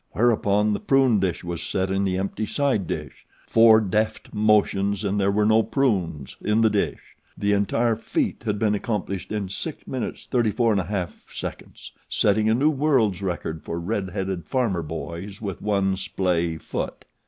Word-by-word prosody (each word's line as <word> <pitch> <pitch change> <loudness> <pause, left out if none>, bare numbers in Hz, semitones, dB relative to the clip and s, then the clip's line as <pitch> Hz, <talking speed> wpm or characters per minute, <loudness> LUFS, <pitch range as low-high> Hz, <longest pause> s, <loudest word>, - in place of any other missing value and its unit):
Whereupon 105 -2 +2
the - - -1
prune 135 -5 +3
dish 90 -3 -1
was 85 -1 -4
set 95 +2 -1
in 95 +1 +1
the 95 -1 0
empty 100 +3 -2
side 135 - 0
dish 75 -4 -6 0.2
four 115 -1 +6
deft 110 +1 -1
motions 105 -2 +2
and 100 0 0
there 100 - +3
were 105 +1 +2
no 110 +1 +5
prunes 95 - -1
in 105 +2 +2
the 110 -1 +4
dish. 105 - -2 0.2
The 100 0 +1
entire 110 +3 +2
feat 115 - -2
had 105 -3 -1
been 105 0 +2
accomplished 100 -3 -3
in 105 -2 -1
6:34 130 - -5
1/2, 105 -6 -2 0.2
setting 105 +1 +2
a 110 - +4
new 145 +5 +3
world's 130 - +2
record 85 -4 -3
for 85 - -4
red 95 +2 -2
headed 95 -2 -4
farmer 115 -10 0
boys 85 +5 -6
with 100 -5 -5
one 100 -2 +1
splay 85 -3 -1
foot. - - -5
100 Hz, 155 wpm, -24 LUFS, 95-110 Hz, 0.2 s, four